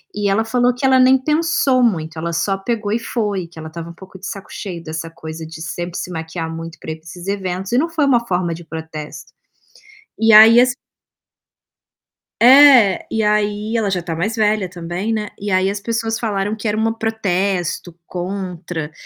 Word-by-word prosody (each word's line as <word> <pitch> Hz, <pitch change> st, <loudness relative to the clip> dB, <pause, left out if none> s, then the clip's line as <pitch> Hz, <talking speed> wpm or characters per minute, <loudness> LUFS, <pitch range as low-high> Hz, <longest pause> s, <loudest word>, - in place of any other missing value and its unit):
E 205 Hz, -1 st, 0 dB
ela 220 Hz, +3 st, +1 dB
falou 245 Hz, +1 st, +2 dB
que 250 Hz, +2 st, -3 dB
ela 260 Hz, -1 st, +5 dB
nem 260 Hz, +1 st, +6 dB
pensou 300 Hz, -3 st, +1 dB
muito, 160 Hz, -8 st, 0 dB
ela 170 Hz, +1 st, -3 dB
só 195 Hz, +3 st, 0 dB
pegou 215 Hz, 0 st, -3 dB
e 230 Hz, -, +1 dB
foi, 205 Hz, -6 st, -2 dB
que 165 Hz, -1 st, -13 dB
ela 160 Hz, -, -7 dB
estava 170 Hz, +1 st, -8 dB
um -, -, -9 dB
pouco 190 Hz, +2 st, -13 dB
de 190 Hz, -, -10 dB
saco 200 Hz, -4 st, -7 dB
cheio 180 Hz, -5 st, -6 dB
dessa 160 Hz, 0 st, -5 dB
coisa 160 Hz, 0 st, -8 dB
de 160 Hz, 0 st, -10 dB
sempre 175 Hz, +2 st, -5 dB
se -, -, -5 dB
maquiar 160 Hz, 0 st, -5 dB
muito 165 Hz, 0 st, -8 dB
para 160 Hz, -, -6 dB
ir -, -, -4 dB
pra 160 Hz, -, -28 dB
esses 175 Hz, +2 st, -10 dB
eventos 190 Hz, 0 st, -3 dB
e 245 Hz, -, +2 dB
não 325 Hz, +5 st, +1 dB
foi 320 Hz, -3 st, +1 dB
uma 240 Hz, -4 st, +2 dB
forma 180 Hz, -2 st, 0 dB
de 170 Hz, -, -11 dB
protesto. 160 Hz, -1 st, -8 dB, 0.9 s
E 225 Hz, 0 st, +4 dB
aí 225 Hz, +3 st, +9 dB
as 250 Hz, 0 st, +3 dB, 1.7 s
É, 255 Hz, -5 st, +7 dB
e 220 Hz, -1 st, -1 dB
aí, 210 Hz, +1 st, 0 dB
ela 220 Hz, -3 st, +1 dB
já 185 Hz, -2 st, 0 dB
está 170 Hz, -1 st, -5 dB
mais 205 Hz, +8 st, -2 dB
velha 210 Hz, -3 st, +1 dB
também, 180 Hz, +4 st, -4 dB
né. 215 Hz, -1 st, -2 dB
E 205 Hz, +1 st, -4 dB
aí 185 Hz, +1 st, +2 dB
as 205 Hz, -, -4 dB
pessoas 225 Hz, +1 st, -2 dB
falaram 205 Hz, -2 st, -1 dB
que 220 Hz, +1 st, -5 dB
era 210 Hz, 0 st, 0 dB
uma 225 Hz, 0 st, 0 dB
protesto 190 Hz, -6 st, -2 dB
contra 180 Hz, -4 st, -5 dB
195 Hz, 200 wpm, -19 LUFS, 170-225 Hz, 1.7 s, aí